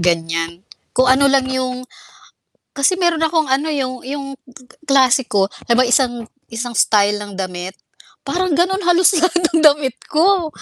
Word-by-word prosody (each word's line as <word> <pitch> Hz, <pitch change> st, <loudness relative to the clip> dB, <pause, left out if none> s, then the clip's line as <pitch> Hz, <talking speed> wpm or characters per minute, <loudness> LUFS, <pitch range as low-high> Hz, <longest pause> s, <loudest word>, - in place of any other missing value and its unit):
ganiyan. 165 Hz, +1 st, -2 dB, 0.3 s
Kung 255 Hz, -, +4 dB
ano 275 Hz, +1 st, +3 dB
lang 270 Hz, -1 st, +2 dB
'yong 255 Hz, -1 st, -3 dB, 0.9 s
kasi 325 Hz, +7 st, +1 dB
mayro'n 345 Hz, -3 st, +1 dB
akong 320 Hz, -1 st, +1 dB
ano, 275 Hz, +4 st, -1 dB
'yong 255 Hz, -4 st, -3 dB
'yong 275 Hz, +1 st, -6 dB
g 260 Hz, -1 st, -18 dB
g -, -, -39 dB
klase 270 Hz, -3 st, +3 dB
ko 195 Hz, -2 st, +2 dB, 0.2 s
na 235 Hz, -, +3 dB
ba 255 Hz, -, +4 dB
isang 240 Hz, -2 st, 0 dB, 0.2 s
isang 235 Hz, +1 st, -5 dB
style 210 Hz, 0 st, +2 dB
ng 205 Hz, -2 st, -10 dB
damit. 185 Hz, 0 st, -6 dB, 0.5 s
Parang 370 Hz, +1 st, -1 dB
gano'n 370 Hz, +5 st, 0 dB
halos 355 Hz, +2 st, +3 dB
lahat 345 Hz, +1 st, +1 dB, 0.2 s
ng 325 Hz, -, +3 dB
damit 285 Hz, -4 st, +3 dB, 0.2 s
ko. 340 Hz, +1 st, +2 dB
265 Hz, 165 wpm, -17 LUFS, 225-315 Hz, 0.9 s, Kung